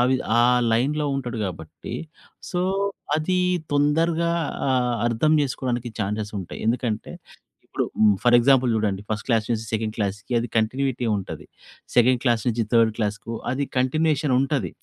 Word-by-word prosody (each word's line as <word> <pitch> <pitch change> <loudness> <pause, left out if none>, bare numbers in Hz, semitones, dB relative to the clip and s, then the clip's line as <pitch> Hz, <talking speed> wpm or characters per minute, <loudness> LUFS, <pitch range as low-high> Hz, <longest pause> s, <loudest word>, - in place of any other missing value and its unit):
విధ 130 - +1 0.2
ఆ - - +5 0.3
లైన్‌లో 145 +6 +1
ఉంటాడు 125 -3 -4
కాబట్టి, 80 -4 -8 0.6
సో, 180 - -1 0.6
అది 180 +4 0 0.4
తొందరగా 165 +3 +2 0.4
ఆహ్, 125 -2 +1
అర్థం 120 +7 +2
చేసుకోవడానికి 125 -3 -2
ఛాన్సెస్ 105 +1 -2
ఉంటాయి. 90 - -8
ఎందుకంటే, 115 -3 -1 0.5
ఇప్పుడు - - -2 0.4
ఫర్ 120 -1 +4
ఎగ్జాంపుల్ 130 0 +4
చూడండి. 100 -3 -1
ఫస్ట్ 105 -1 -2
క్లాస్ 115 -4 +1
నుంచి 110 -2 0
సెకండ్ 110 0 -1
క్లాస్‌కి 100 +1 -3
అది 115 0 -3
కంటిన్యూటీ 125 +3 0
ఉంటది. 95 - -6 0.5
సెకండ్ 125 0 +4
క్లాస్ 120 -5 +2
నుంచి 115 -1 +1
థర్డ్ 115 -1 +5
క్లాస్‌కు 105 +1 -3 0.2
అది 135 +3 -1
కంటిన్యూయేషన్ 145 +2 +1
ఉంటది. 135 0 -1
120 Hz, 140 wpm, -23 LUFS, 110-135 Hz, 0.6 s, ఆ